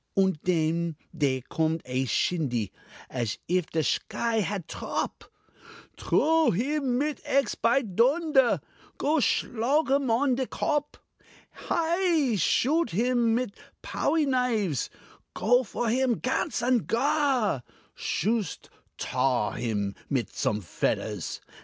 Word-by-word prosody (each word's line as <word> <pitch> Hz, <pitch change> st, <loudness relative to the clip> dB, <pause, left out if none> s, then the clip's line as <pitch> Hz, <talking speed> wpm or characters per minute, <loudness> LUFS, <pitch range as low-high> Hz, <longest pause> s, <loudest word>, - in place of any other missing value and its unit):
Und 190 Hz, -5 st, +2 dB
denn 165 Hz, -1 st, +1 dB, 0.2 s
dere 135 Hz, -5 st, 0 dB
coomed 160 Hz, 0 st, 0 dB
a 130 Hz, +1 st, -1 dB
shindy, 125 Hz, -, 0 dB, 0.4 s
Ash 120 Hz, -5 st, -3 dB
if 180 Hz, -1 st, +1 dB
de 160 Hz, -, 0 dB
shky 230 Hz, +8 st, 0 dB
hat 190 Hz, -2 st, -3 dB
trop: -, -, -4 dB, 0.7 s
"Trow 320 Hz, 0 st, +3 dB
him 260 Hz, -, 0 dB
mit 295 Hz, +2 st, -1 dB
ecks, 275 Hz, -5 st, +1 dB
py 240 Hz, +4 st, +2 dB
doonder! 265 Hz, -, +3 dB, 0.4 s
Go 305 Hz, +3 st, +1 dB
shlog 265 Hz, +4 st, +1 dB
him 275 Hz, -2 st, +2 dB
on 255 Hz, +4 st, +3 dB
de 260 Hz, -1 st, -1 dB
kop! 295 Hz, 0 st, -1 dB, 0.5 s
Hei! 335 Hz, -, +1 dB
Shoot 270 Hz, -, +2 dB
him 235 Hz, +3 st, +2 dB
mit 245 Hz, -3 st, -1 dB
a -, -, -22 dB
powie 315 Hz, -2 st, +1 dB
knifes; 235 Hz, -, 0 dB, 0.5 s
Go 245 Hz, +4 st, +3 dB
for 240 Hz, +1 st, -3 dB
him, 245 Hz, +1 st, +2 dB
ganz 260 Hz, +2 st, -1 dB
and 245 Hz, -2 st, +2 dB
gar! 260 Hz, -, +1 dB, 0.3 s
Shoost 215 Hz, -1 st, -2 dB, 0.3 s
tar 125 Hz, -4 st, 0 dB
him 105 Hz, -4 st, -2 dB, 0.2 s
mit 130 Hz, -5 st, -1 dB
some 105 Hz, 0 st, -1 dB
fedders! 100 Hz, +2 st, -2 dB
230 Hz, 120 wpm, -27 LUFS, 160-270 Hz, 0.7 s, Trow